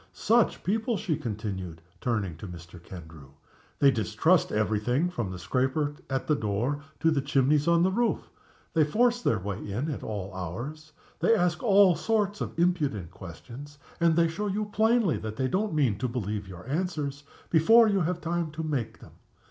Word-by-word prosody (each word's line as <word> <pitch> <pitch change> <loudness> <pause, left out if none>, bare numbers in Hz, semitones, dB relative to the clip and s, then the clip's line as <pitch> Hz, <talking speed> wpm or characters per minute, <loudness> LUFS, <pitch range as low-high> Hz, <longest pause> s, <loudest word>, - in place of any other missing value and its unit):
Such 235 0 +2
people!" 220 +3 0
she 190 -7 -1
continued, 100 - -5 0.2
turning 105 -9 -1
to 100 - -8
Mr. 85 0 -11
Kendrew. 80 -6 -12 0.4
"They 140 -1 +5
distrust 125 +9 +2
every 105 0 +1
thing, 130 +11 0
from 120 - -3
the 90 - -6
scraper 130 - 0 0.2
at 135 -1 -1
the 155 - +2
door 115 +6 -1 0.2
to 160 - +4
the 145 -3 +1
chimneys 140 +2 +2
on 170 0 +4
the 190 - +3
roof. 235 +4 -1 0.4
They 160 - +4
force 240 +10 +2
their 115 - +2
way 100 0 -4
in 115 +10 -3
at 140 - -5
all 100 -3 -5
hours. 125 - -6 0.3
They 230 - +4
ask 180 +2 +1
all 200 -6 +5
sorts 210 +3 0
of - - -4
impudent 150 - 0
questions 115 - -10 0.2
and 170 -1 +3
they 170 0 +4
show 195 +6 -3
you 205 +1 -2
plainly 220 -4 +3
that 110 0 -6
they 130 +3 0
don't 195 +5 -1
mean 125 -10 +1
to 130 - 0
believe 105 -4 -3
your 90 +3 -10
answers, 145 -3 -2 0.3
before 225 +9 +6
you 200 -3 +2
have 175 +1 -1
time 170 -1 -1
to 160 +1 -4
make 145 -7 -3
them. - - -14
145 Hz, 180 wpm, -27 LUFS, 105-180 Hz, 0.4 s, before